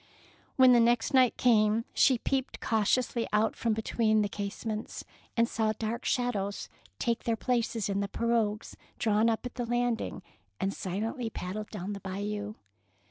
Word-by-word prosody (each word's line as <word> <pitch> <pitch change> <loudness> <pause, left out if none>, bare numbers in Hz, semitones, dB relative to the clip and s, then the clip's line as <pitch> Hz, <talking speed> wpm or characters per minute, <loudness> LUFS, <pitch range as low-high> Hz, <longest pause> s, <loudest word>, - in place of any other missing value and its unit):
When 260 -1 +7
the 240 - +6
next 235 +1 +2
night 255 -2 +4
came, 220 -1 +3
she 260 - +4
peeped 265 +2 -2
cautiously 230 +2 +1
out 210 +1 +2
from 225 -2 0
between 220 -1 +1
the 205 - -1
case 200 +1 -5
ments, 215 0 -4 0.3
and 230 0 +4
saw 220 -1 0
dark 230 +3 -3
figures 210 -6 -1 0.3
take 235 -2 -1
their 230 - +1
places 230 -2 -1
in 200 -1 -1
the 200 - -1
pirogues 225 -1 -1 0.2
drawn 220 0 +2
up 225 +2 -1
at 245 - -5
the 245 - -3
landing 240 -4 -1 0.4
and 195 +1 -1
silently 225 +6 -3
paddle 210 +1 -5
down 205 -1 -5
the 200 - -6
Bayou. 205 +2 -4
225 Hz, 160 wpm, -29 LUFS, 210-235 Hz, 0.4 s, When